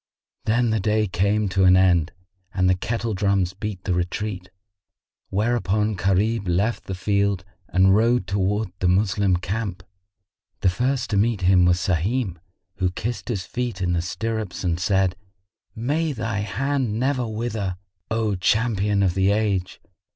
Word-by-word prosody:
Then 120 Hz, +1 st, +2 dB
the 110 Hz, -, +1 dB
day 105 Hz, +2 st, +1 dB
came 100 Hz, +3 st, +1 dB
to 95 Hz, +1 st, +1 dB
an 90 Hz, 0 st, +7 dB
end 90 Hz, -3 st, +3 dB, 0.4 s
and 95 Hz, -1 st, +2 dB
the 90 Hz, -, +5 dB
kettle 115 Hz, +4 st, -2 dB
drums 100 Hz, -2 st, +1 dB
beat 100 Hz, -1 st, -5 dB
the 95 Hz, -, 0 dB
retreat; 90 Hz, +1 st, -3 dB, 0.8 s
whereupon 105 Hz, 0 st, +1 dB
Gharib 100 Hz, +3 st, +1 dB
left 100 Hz, +7 st, 0 dB
the 95 Hz, -, -4 dB
field 100 Hz, 0 st, 0 dB, 0.2 s
and 95 Hz, +1 st, +4 dB
rode 115 Hz, -1 st, +3 dB
towards 100 Hz, +1 st, -1 dB
the 90 Hz, -, +1 dB
Moslem 95 Hz, 0 st, +2 dB
camp. 95 Hz, 0 st, -4 dB, 0.8 s
The -, -, +4 dB
first 125 Hz, +5 st, -1 dB
to 100 Hz, -, +1 dB
meet 110 Hz, -1 st, +1 dB
him 90 Hz, -1 st, +5 dB
was 90 Hz, 0 st, +4 dB
Sahim, 95 Hz, +3 st, 0 dB, 0.4 s
who 90 Hz, -1 st, +1 dB
kissed 115 Hz, +8 st, -4 dB
his 100 Hz, -6 st, -2 dB
feet 120 Hz, -5 st, -3 dB
in 90 Hz, -1 st, 0 dB
the 85 Hz, -, +1 dB
stirrups 110 Hz, +1 st, -4 dB
and 85 Hz, -2 st, 0 dB
said, 95 Hz, 0 st, +1 dB, 0.6 s
"May 150 Hz, +7 st, -1 dB
thy 115 Hz, -3 st, -3 dB
hand 125 Hz, +1 st, -1 dB
never 130 Hz, -1 st, 0 dB
wither, 110 Hz, -4 st, -3 dB, 0.3 s
O 110 Hz, -2 st, 0 dB
champion 105 Hz, +1 st, +1 dB
of 90 Hz, -3 st, +2 dB
the 95 Hz, +1 st, +2 dB
age! 100 Hz, -3 st, 0 dB
100 Hz, 150 wpm, -23 LUFS, 95-110 Hz, 0.8 s, an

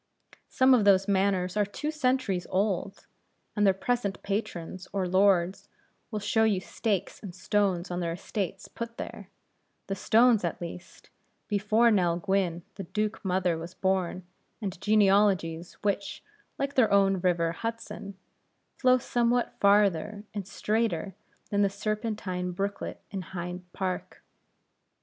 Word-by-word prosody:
Some 260 Hz, 0 st, +5 dB
of 240 Hz, -4 st, +5 dB
those 195 Hz, -1 st, +5 dB
manors 190 Hz, -2 st, +1 dB
are 210 Hz, -, +3 dB
two 250 Hz, +10 st, -4 dB
centuries 255 Hz, -, 0 dB
old; 195 Hz, 0 st, -1 dB, 0.5 s
and 210 Hz, -2 st, +3 dB
their -, -, +7 dB
present 205 Hz, -1 st, -1 dB
patrons 185 Hz, -3 st, -4 dB
or 195 Hz, -2 st, -1 dB
lords 185 Hz, -1 st, +2 dB, 0.4 s
will 215 Hz, -, -3 dB
show 220 Hz, +2 st, +2 dB
you 210 Hz, -4 st, +3 dB
stakes 200 Hz, +1 st, -2 dB
and 185 Hz, -5 st, -8 dB
stones 190 Hz, -3 st, 0 dB
on 175 Hz, -, -2 dB
their 170 Hz, -1 st, -1 dB
estates 195 Hz, +1 st, -4 dB
put 230 Hz, 0 st, -7 dB
there -, -, -7 dB, 0.6 s
the 195 Hz, -, -3 dB
stones 225 Hz, +2 st, +4 dB
at 170 Hz, -, -2 dB
least 175 Hz, +1 st, -9 dB, 0.4 s
before 215 Hz, +3 st, +3 dB
Nell 175 Hz, -5 st, +2 dB
Gwynne 180 Hz, -2 st, 0 dB
the 195 Hz, -, -5 dB
Duke 215 Hz, +4 st, -2 dB
mother 180 Hz, -3 st, +1 dB
was 170 Hz, +3 st, -8 dB
born, 185 Hz, -1 st, -1 dB, 0.3 s
and 195 Hz, -5 st, -5 dB
genealogies 195 Hz, -5 st, +3 dB
which, 200 Hz, -1 st, -2 dB, 0.3 s
like 275 Hz, 0 st, -2 dB
their 255 Hz, -5 st, +4 dB
own 195 Hz, -1 st, +4 dB
river, 175 Hz, -2 st, +1 dB
Hudson, 215 Hz, 0 st, -6 dB, 0.6 s
flow 255 Hz, -1 st, +5 dB
somewhat 240 Hz, 0 st, 0 dB
farther 205 Hz, 0 st, +3 dB
and 200 Hz, -3 st, -5 dB
straighter 215 Hz, -1 st, -1 dB, 0.4 s
than 205 Hz, 0 st, +2 dB
the 200 Hz, -, +4 dB
Serpentine 200 Hz, -3 st, -3 dB
brooklet 200 Hz, +2 st, -3 dB
in 195 Hz, -1 st, -3 dB
Hyde 180 Hz, 0 st, -7 dB
Park. 185 Hz, -1 st, -4 dB
195 Hz, 135 wpm, -28 LUFS, 180-215 Hz, 0.6 s, their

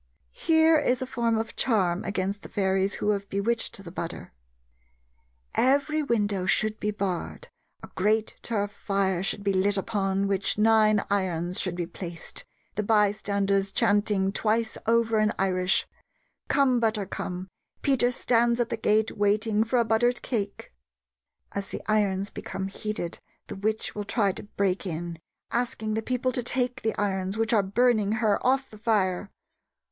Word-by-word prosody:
Here 320 Hz, -1 st, +4 dB
is 255 Hz, -3 st, +1 dB
a -, -, -3 dB
form 235 Hz, -3 st, 0 dB
of 225 Hz, +1 st, -3 dB
charm 190 Hz, -7 st, +1 dB
against 195 Hz, +1 st, -2 dB
the -, -, -10 dB
fairies 190 Hz, 0 st, +1 dB
who 210 Hz, -, 0 dB
have 200 Hz, -1 st, -3 dB
bewitched 200 Hz, 0 st, -1 dB
the 170 Hz, -, -9 dB
butter: 170 Hz, -1 st, -6 dB, 1.2 s
"Every 285 Hz, +4 st, +2 dB
window 205 Hz, -8 st, 0 dB
should 215 Hz, +4 st, +3 dB
be 210 Hz, -, -1 dB
barred, 200 Hz, -, -3 dB, 0.3 s
a -, -, -7 dB
great 215 Hz, +3 st, +1 dB
turf 205 Hz, -3 st, -2 dB
fire 195 Hz, -3 st, -1 dB
should 200 Hz, +1 st, -1 dB
be 200 Hz, -1 st, +1 dB
lit 195 Hz, +2 st, +2 dB
upon 195 Hz, -1 st, 0 dB
which 195 Hz, 0 st, 0 dB
nine 215 Hz, -1 st, +4 dB
irons 180 Hz, -2 st, 0 dB
should 185 Hz, -2 st, -1 dB
be 175 Hz, -1 st, -2 dB
placed, 170 Hz, -1 st, -8 dB, 0.3 s
the 210 Hz, -, -1 dB
bystanders 200 Hz, -2 st, +1 dB
chanting 205 Hz, -3 st, +2 dB
twice 220 Hz, +2 st, 0 dB
over 230 Hz, -1 st, +3 dB
in 215 Hz, 0 st, +3 dB
Irish, 185 Hz, -1 st, +1 dB, 0.6 s
'Come, 260 Hz, -3 st, +3 dB
butter, 220 Hz, -3 st, 0 dB
come; 185 Hz, -1 st, -5 dB, 0.4 s
Peter 255 Hz, -3 st, +3 dB
stands 235 Hz, -1 st, +2 dB
at 240 Hz, -, +1 dB
the 230 Hz, -, -2 dB
gate 220 Hz, 0 st, +1 dB
waiting 210 Hz, +1 st, +2 dB
for 230 Hz, +3 st, 0 dB
a 235 Hz, -, +3 dB
buttered 240 Hz, +2 st, +1 dB
cake.' 205 Hz, -, -3 dB, 0.8 s
As 200 Hz, -1 st, -4 dB
the -, -, -7 dB
irons 200 Hz, -2 st, +1 dB
become 190 Hz, 0 st, -5 dB
heated 200 Hz, -4 st, -4 dB, 0.3 s
the -, -, -7 dB
witch 215 Hz, +2 st, -2 dB
will 205 Hz, -1 st, -4 dB
try 205 Hz, -2 st, +1 dB
to -, -, -8 dB
break 200 Hz, -1 st, -1 dB
in, 170 Hz, 0 st, -5 dB, 0.3 s
asking 230 Hz, -3 st, -1 dB
the 220 Hz, -, 0 dB
people 255 Hz, +2 st, -1 dB
to 250 Hz, -, -1 dB
take 250 Hz, +1 st, 0 dB
the 220 Hz, -, -1 dB
irons, 195 Hz, -1 st, -1 dB
which 225 Hz, 0 st, +1 dB
are 215 Hz, -, +5 dB
burning 215 Hz, +1 st, +2 dB
her, 220 Hz, -2 st, +1 dB
off 265 Hz, +1 st, +1 dB
the 215 Hz, -, -12 dB
fire. 200 Hz, -4 st, +1 dB
210 Hz, 160 wpm, -27 LUFS, 195-230 Hz, 1.2 s, are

